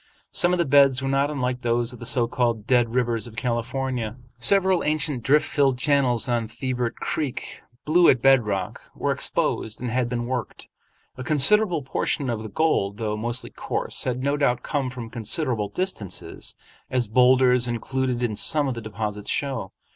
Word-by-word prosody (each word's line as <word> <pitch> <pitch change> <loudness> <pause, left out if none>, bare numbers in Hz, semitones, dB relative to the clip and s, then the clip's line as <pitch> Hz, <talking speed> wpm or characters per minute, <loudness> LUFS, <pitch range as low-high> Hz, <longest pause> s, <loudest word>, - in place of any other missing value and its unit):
Some 175 - +3
of 180 - +2
the 170 - +1
beds 135 -1 +4
were - - -1
not 140 +1 +1
unlike 125 -4 -2
those 120 +1 0
of 125 - -11
the 120 - -5
so 120 -2 +2
called 120 -3 -1
Dead 120 -2 +2
Rivers 120 -2 0
of 115 - -12
California. 120 -1 -2 0.2
Several 190 +6 +3
ancient 155 -4 -1
drift 145 +6 +3
filled 135 -4 +2
channels 130 -4 +2
on 120 -2 0
Thibert 120 +1 -3
Creek, 145 -5 -4 0.2
blue 170 +3 +5
at 130 - +4
bed 135 0 +5
rock, 95 -3 -3
were - - -1
exposed 110 0 -1
and 125 -2 -4
had 125 0 0
been 120 -1 -2
worked. 125 0 -4 0.5
A 130 - -5
considerable 165 +4 +3
portion 135 0 -1
of 110 -2 -3
the 110 - -7
gold, 100 -7 0
though 105 -2 -2
mostly 120 +3 -2
coarse, - - -2
had 125 0 -2
no 140 +1 +1
doubt 125 -4 +1
come 140 -4 -2
from 120 -3 -8
considerable 115 -1 -2
distances, 145 - -4 0.3
as 125 -3 0
boulders 125 +1 +4
included 125 +1 -2
in 110 -3 -1
some 150 +6 +2
of 130 - -1
the 115 - -6
deposits 105 -1 -5
show. 135 -9 -2
125 Hz, 175 wpm, -24 LUFS, 115-140 Hz, 0.5 s, blue